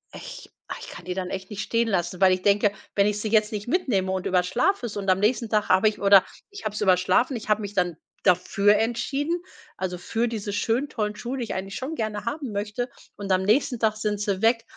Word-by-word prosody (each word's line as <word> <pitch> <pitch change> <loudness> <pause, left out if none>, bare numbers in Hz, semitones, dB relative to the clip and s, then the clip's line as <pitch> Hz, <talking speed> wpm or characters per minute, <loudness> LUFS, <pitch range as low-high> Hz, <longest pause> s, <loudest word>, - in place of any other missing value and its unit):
ich, - - -10 0.2
ah, - - -5
ich - - -9
kann 175 - -10
die 180 - -3
dann 185 -1 -4
echt 190 +1 -6
nicht 210 0 -4
stehen 230 +1 0
lassen, 180 -3 -1
weil 190 -1 +6
ich 185 - -2
denke, 205 +1 +3 0.2
wenn 200 - +4
ich 210 0 -1
sie 215 - -2
jetzt 215 0 +3
nicht 210 +1 -4
mitnehme 240 - +1
und 190 -1 -2
überschlafe 190 - +1
es 210 - -7
und 195 -1 -2
am 185 - +2
nächsten 230 +2 +1
Tag 210 -1 +1
habe 190 +3 +5
ich 215 - -1
oder 200 -1 +7 0.2
ich 405 0 -10
habe 215 - -2
es - - -4
überschlafen, 185 +6 +3
ich 220 - -9
habe 215 0 +3
mich 205 -1 -6
dann 180 -3 +1 0.3
dafür 200 +3 +4
entschieden, 275 +9 -1 0.3
also 180 -1 -3
für 230 +6 -1
diese 210 -3 -4
schönen 230 +7 0
tollen 210 -5 -2
Schuhe, 245 +5 -5
die 250 - -2
ich 225 - -4
eigentlich 195 +1 -5
schon 265 +5 -4
gerne 215 -5 -3
haben 255 0 -4
möchte, 210 +5 -3 0.3
und 200 -1 -6
am 185 0 +2
nächsten 235 +4 +2
Tag 215 -1 +1
sind 210 -1 -1
sie 200 -2 -1
weg. 230 +1 +3
210 Hz, 240 wpm, -25 LUFS, 190-230 Hz, 0.3 s, oder